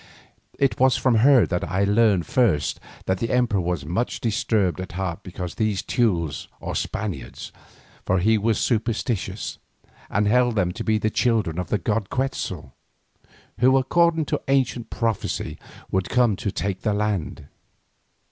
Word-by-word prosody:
It 135 -6 +1
was 130 0 +4
from 125 -3 +2
her 125 -2 +6
that 90 +3 -2
I 95 +4 0
learned 100 -3 +3
first 90 - +1 0.3
that 95 0 0
the 115 - -2
emperor 120 -6 +2
was 85 -4 -2
much 95 +10 -2
disturbed 110 -6 0
at 95 - -7
heart 90 -2 -3
because 90 -2 -6
of - - -25
these 110 -4 0
Teules 85 - 0
or - - -5
Spaniards, 100 -3 -4 0.5
for 95 - +1
he 110 +5 +3
was 110 +1 +1
superstitious, 115 -2 -1 0.5
and 105 +1 +1
held 120 +1 +3
them 90 -4 +1
to - - -5
be 110 0 +2
the 110 0 0
children 110 -10 +1
of 90 - -3
the 105 - +1
god 105 +2 -1
Quetzal, 95 - -3 0.9
who 130 +3 +5
according 165 +4 +2
to - - -2
ancient 130 -3 +1
prophecy 115 -4 -2 0.3
would 95 -1 0
come 120 -5 +3
to 100 - -3
take 95 -1 -3
the 105 -2 0
land. 105 -8 -2
105 Hz, 155 wpm, -23 LUFS, 95-120 Hz, 0.9 s, her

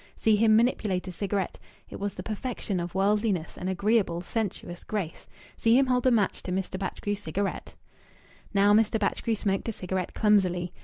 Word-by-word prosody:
See 220 -1 +3
him 215 +1 +5
manipulate 215 -5 +1
a - - -4
cigarette 195 0 -2 0.3
it - - -9
was 200 0 -3
the - - -6
perfection 215 -3 -3
of 175 +1 -5
worldliness 200 -3 +1
and 185 - -4
agreeable, 195 -2 +1
sensuous 180 -3 -4
grace! 195 -7 -4 0.3
See 230 +1 +5
him 270 - +5
hold 250 0 +2
a - - +7
match 220 -6 +1
to 185 - -5
Mr. 185 0 -2
Batchgrew's 200 +1 -3
cigarette! 195 +2 -3 0.8
Now 205 0 +4
Mr. 220 +1 +3
Batchgrew 220 +2 0
smoked 195 +2 -1
a - - 0
cigarette 185 -3 -4
clumsily. 185 -5 +2
200 Hz, 170 wpm, -27 LUFS, 185-220 Hz, 0.8 s, a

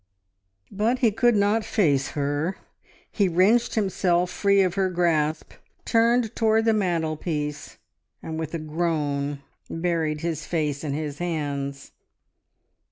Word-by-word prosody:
But 220 +5 +1
he 235 -3 +3
could 240 +2 +3
not 205 +2 +2
face 145 -13 +1
her. 145 +6 -1 0.5
He 200 -3 +2
wrenched 190 +7 +3
himself 180 -4 +1
free 200 -1 +3
of 180 -2 0
her 190 -1 +1
grasp, 160 -3 0 0.3
turned 230 0 +2
towards 225 0 +2
the 225 - +4
mantelpiece, 160 -6 -2 0.5
and 160 0 -5
with 160 +1 -4
a - - 0
groan 150 -3 -2 0.3
buried 165 -3 -1
his 165 -2 -3
face 150 -4 -1
in 145 -3 -2
his 150 -1 -4
hands. 140 -5 -3
170 Hz, 125 wpm, -24 LUFS, 150-200 Hz, 0.5 s, the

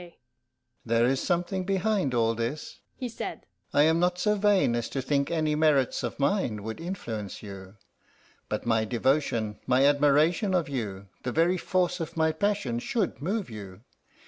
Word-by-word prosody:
"There 115 0 +2
is 130 +2 +1
something 180 +1 -1
behind 195 - 0
all 115 -1 +2
this," 120 +6 -4 0.2
he 255 - -4
said. 230 - -6 0.3
"I 145 - +4
am 160 +2 +3
not 180 0 +2
so 210 +3 +2
vain 205 - +3
as 120 -1 -2
to 135 - -3
think 140 +1 0
any 155 -2 0
merits 150 -4 +2
of - - -4
mine 140 - 0
would 110 +7 -6
influence 115 - -5
you. 95 -1 -9 0.7
But 105 - -3
my 115 -2 +2
devotion, 115 -2 0
my 130 +2 +4
admiration 150 +7 +3
of 175 -3 +1
you, 100 -8 -5
the 125 - -3
very 170 +5 +2
force 180 0 0
of 165 0 -5
my 160 0 +3
passion, 200 - -1
should 200 - -2
move 200 +6 -1
you. 100 -2 -9
145 Hz, 165 wpm, -27 LUFS, 115-180 Hz, 0.7 s, I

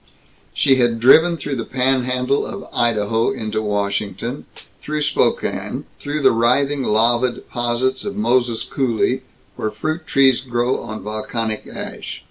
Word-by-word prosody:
She 135 -2 +4
had 120 -2 +2
driven 160 +8 +6
through 140 -2 -4
the 115 - -2
panhandle 130 +1 +1
of - - -6
Idaho 115 -1 +1
into 110 -5 -3
Washington, 105 +3 -2 0.4
through 150 0 -3
Spokane, 150 0 0 0.2
through 145 0 -3
the - - +6
writhing 135 +5 +2
lava 120 +2 +3
deposits 120 +2 -2
of 205 0 -4
Moses 125 - +1
Coulee 130 0 0 0.4
where 110 - -1
fruit 155 +10 -4
trees 135 -3 +4
grow 120 0 0
on 110 -4 -7
volcanic 110 +1 -3
ash. - - -7
125 Hz, 130 wpm, -20 LUFS, 115-135 Hz, 0.4 s, driven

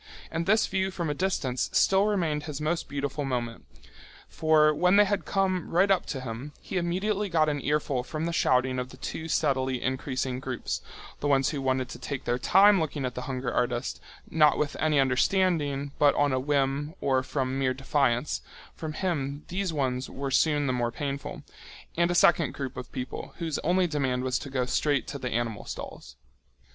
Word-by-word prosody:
And 165 +1 -2
this 215 +2 +4
view 190 0 0
from 170 -5 -3
a - - 0
distance 145 -7 -1
still 195 +2 +4
remained 165 -8 0
his 150 -2 -5
most 160 +3 -1
beautiful 140 +1 -3
moment. 120 -4 -3 0.6
For 155 -1 +3
when 180 +5 +3
they 205 0 +7
had 205 0 -1
come 190 -3 0
right 190 +4 +3
up 190 - +2
to 135 - -4
him, 130 +4 -6
he 190 - -5
immediately 190 +4 0
got 160 -3 +3
an 145 -1 -2
earful 145 -3 0
from 155 +4 -4
the 170 - -2
shouting 130 -3 +2
of 125 0 -4
the 130 - -13
two 160 +4 -5
steadily 130 -5 +1
increasing 130 -1 -2
groups, 125 - -4 0.4
the 145 - -1
ones 135 -2 +3
who 145 -3 -3
wanted 130 -1 0
to - - -8
take 130 +1 -5
their 120 +1 -1
time 195 +7 +6
looking 145 -3 -2
at 125 - -3
the 125 - -5
hunger 130 -1 -2
artist, 125 +1 -1 0.3
not 150 -2 +4
with 150 -1 -1
any 155 -2 +2
understanding 145 0 +1
but 145 -1 +5
on 145 -2 +2
a 130 - +1
whim 140 +3 0
or 130 -1 +2
from 130 0 -2
mere 130 -1 +1
defiance—for 135 +3 -2
him 150 -5 -2
these 185 0 -1
ones 130 -4 -1
were 135 0 -4
soon 145 +1 +3
the 130 - +1
more 120 -1 0
painful—and 140 +5 -4
a 175 - 0
second 170 -4 +4
group 135 -2 -5
of 125 - -7
people 130 0 -6
whose 165 -3 -2
only 180 +3 +2
demand 135 -6 -1
was 130 -1 0
to 140 - -7
go 130 -2 0
straight 140 +2 +1
to 140 - -6
the 125 - -3
animal 115 -3 -2
stalls. 60 +1 -8
145 Hz, 190 wpm, -27 LUFS, 130-165 Hz, 0.6 s, they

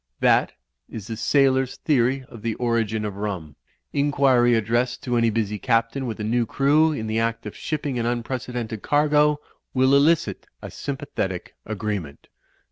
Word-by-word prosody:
That - - +3 0.4
is 110 -4 -7
the 115 - -5
sailor's 130 +1 +2
theory 130 -2 +1
of 115 - -12
the 115 -1 -2
origin 115 -3 0
of 100 -2 -5
rum. 95 -8 -4 0.4
Inquiry 135 -4 +3
addressed 120 +3 0
to 125 -2 -1
any 115 -1 +3
busy 105 -2 -1
Captain 115 +3 0
with 110 -1 -5
a - - -3
new 115 +2 +1
crew 150 +6 +3
in 125 -8 -3
the 110 +1 -1
act 115 0 -1
of 105 - -7
ship 155 -2 -3
ping 135 -4 -2
an 115 - 0
unprecedented 120 -2 -3
cargo, 150 0 +3 0.4
will 130 +1 +4
elicit 150 +4 +2
a - - -8
sympathetic 135 -10 -4
agreement." 100 -9 -4
120 Hz, 160 wpm, -23 LUFS, 110-135 Hz, 0.4 s, will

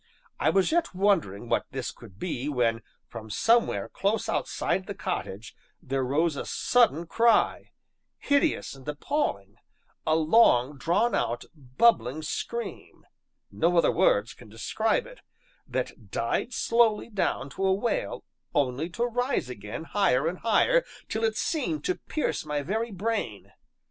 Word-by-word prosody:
I - - +3
was 195 +5 +2
yet 335 - +1
wondering 175 - +1
what - - 0
this 130 -2 -4
could 100 -5 -15
be, 145 - -3
when, 120 -4 +1 0.3
from 110 0 -9
somewhere 230 - +2
close 205 +3 -1
outside 190 - -1
the 200 - -5
cottage, 115 - -5 0.2
there 135 0 -2
rose 150 +5 +1
a - - -3
sudden 200 - +2
cry 230 +7 +2 0.5
hideous 285 +2 +1
and 135 0 -14
appalling 145 - -2 0.5
a 155 - +4
long 155 - +4
drawn 200 - +2
out, 120 +1 -1
bubbling 145 - +2
scream 235 +9 -5 0.5
(no 170 +2 +1
other 170 - +5
words 115 - +2
can - - -15
describe 115 - 0
it), - - -13 0.5
that - - -4
died 250 - -1
slowly 230 -2 +2
down 195 -10 -2
to 195 - -4
a 190 - +3
wail 235 - -1 0.3
only 140 +3 0
to 235 +7 -2
rise 245 - -1
again 105 +5 -7
higher 165 -6 +2
and 180 +2 -3
higher, - - +3 0.3
till 220 - -2
it 220 -1 +1
seemed 310 0 -1
to 370 - +1 0.2
pierce 310 - -1
my 150 -1 -2
very 220 +8 -2
brain. 205 - -3
175 Hz, 145 wpm, -27 LUFS, -, 0.5 s, other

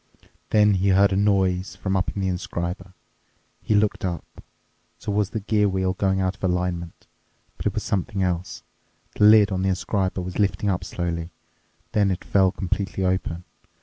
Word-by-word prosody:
Then 105 -1 +4
he 95 +1 +1
heard 100 +1 +4
a - - +1
noise 95 -2 +1
from 95 -1 -2
up 95 - +1
in 100 - -2
the - - 0
inscriber. 90 +1 -4 0.7
He 110 - +1
looked 105 0 +1
up. 85 -4 -5 0.5
So 105 - -5
was 105 -1 +1
the 110 - -3
gear 105 0 +2
wheel 95 -1 0
going 95 -1 0
out 95 0 0
of - - -24
alignment? 90 -2 -2 0.5
But - - -3
it - - -2
was - - -2
something 100 +1 -1
else. 90 -1 -3 0.5
The 105 - +4
lid 105 -1 +7
on 95 -1 -1
the 95 - +1
inscriber 95 0 -1
was 90 +2 -6
lifting 100 0 +1
up 90 - -2
slowly. 85 -1 -3 0.6
Then 100 -2 +2
it 95 -1 -2
fell 95 -2 +3
completely 95 +1 -2
open. 90 -2 -1
95 Hz, 180 wpm, -24 LUFS, 90-100 Hz, 0.7 s, lid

